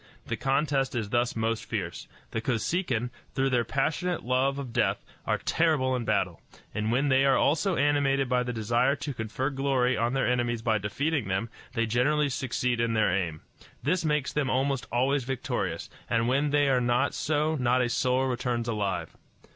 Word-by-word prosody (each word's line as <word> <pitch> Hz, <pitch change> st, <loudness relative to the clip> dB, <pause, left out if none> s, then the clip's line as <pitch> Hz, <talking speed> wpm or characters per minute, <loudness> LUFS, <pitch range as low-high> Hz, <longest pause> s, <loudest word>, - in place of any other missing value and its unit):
The -, -, -2 dB
contest 135 Hz, -1 st, 0 dB
is 110 Hz, -3 st, -2 dB
thus 120 Hz, 0 st, +1 dB
most 115 Hz, 0 st, -1 dB
fierce. 90 Hz, -6 st, -4 dB, 0.2 s
The 115 Hz, -, -2 dB
Kosekin, 120 Hz, -, -1 dB, 0.2 s
through 135 Hz, 0 st, +1 dB
their 120 Hz, -2 st, +3 dB
passionate 150 Hz, -, -1 dB
love 130 Hz, +3 st, +1 dB
of 130 Hz, -4 st, -6 dB
death, -, -, +1 dB, 0.2 s
are -, -, +2 dB
terrible 150 Hz, -6 st, +1 dB
in 120 Hz, -2 st, -3 dB
battle; -, -, 0 dB, 0.3 s
and 105 Hz, +1 st, -1 dB
when 135 Hz, +4 st, +2 dB
they 130 Hz, 0 st, +4 dB
are 135 Hz, -1 st, +4 dB
also 170 Hz, +5 st, +2 dB
animated 140 Hz, -1 st, +2 dB
by 125 Hz, 0 st, +2 dB
the 125 Hz, 0 st, -2 dB
desire 120 Hz, +4 st, +1 dB
to 145 Hz, -, -5 dB
confer 115 Hz, +4 st, -2 dB
glory 135 Hz, -2 st, +1 dB
on 115 Hz, +3 st, 0 dB
their 135 Hz, -4 st, +1 dB
enemies 120 Hz, -2 st, 0 dB
by 110 Hz, -2 st, +2 dB
defeating 135 Hz, +6 st, -1 dB
them, 95 Hz, +4 st, -1 dB, 0.2 s
they 115 Hz, -2 st, +1 dB
generally 140 Hz, +6 st, +2 dB
succeed 125 Hz, -2 st, -1 dB
in 115 Hz, -1 st, 0 dB
their 105 Hz, -5 st, +3 dB
aim. 85 Hz, -5 st, -2 dB, 0.4 s
This 170 Hz, +6 st, +1 dB
makes 150 Hz, -3 st, 0 dB
them 145 Hz, -3 st, 0 dB
almost 135 Hz, 0 st, 0 dB
always 135 Hz, +3 st, +2 dB
victorious, 130 Hz, 0 st, -3 dB, 0.2 s
and 115 Hz, 0 st, +2 dB
when 140 Hz, +4 st, +2 dB
they 145 Hz, 0 st, +3 dB
are 130 Hz, -2 st, +3 dB
not 120 Hz, +1 st, +1 dB
so 155 Hz, +1 st, 0 dB
not 125 Hz, -1 st, +2 dB
a -, -, +1 dB
soul 125 Hz, +2 st, +1 dB
returns 120 Hz, -2 st, -1 dB
alive. 100 Hz, -7 st, -2 dB
125 Hz, 180 wpm, -28 LUFS, 115-140 Hz, 0.4 s, they